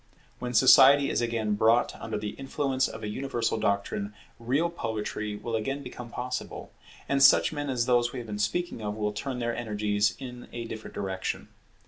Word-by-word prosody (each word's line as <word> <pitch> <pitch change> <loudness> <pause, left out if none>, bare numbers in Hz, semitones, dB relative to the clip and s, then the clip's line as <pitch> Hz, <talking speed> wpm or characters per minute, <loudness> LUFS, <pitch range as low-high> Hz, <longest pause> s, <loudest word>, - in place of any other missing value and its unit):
When 125 0 -4
Society 135 +3 +7
is - - 0
again 115 -3 0
brought 110 +3 +3
under 110 -1 -4
the 105 0 -4
influence 135 -1 -1
of - - -8
a - - -2
universal 120 0 -2
doctrine, 100 0 -1 0.2
real 140 +9 0
poetry 105 -6 -3
will 115 +2 -4
again 135 +6 -2
become 125 -2 -8
possible; 125 +2 -5 0.3
and 140 0 +1
such 140 - +6
men 145 -1 -3
as 120 -3 0
those 120 -1 +2
we - - -7
have 120 - -5
been 105 -2 -5
speaking 145 +6 -1
of 105 -1 -3
will 105 -1 -2
turn 130 +5 -4
their 120 -1 -2
energies 105 -3 0
in 125 -2 -9
a 120 -1 -5
different 110 -1 -8
direction. 95 -1 -3
120 Hz, 180 wpm, -28 LUFS, 105-130 Hz, 0.3 s, Society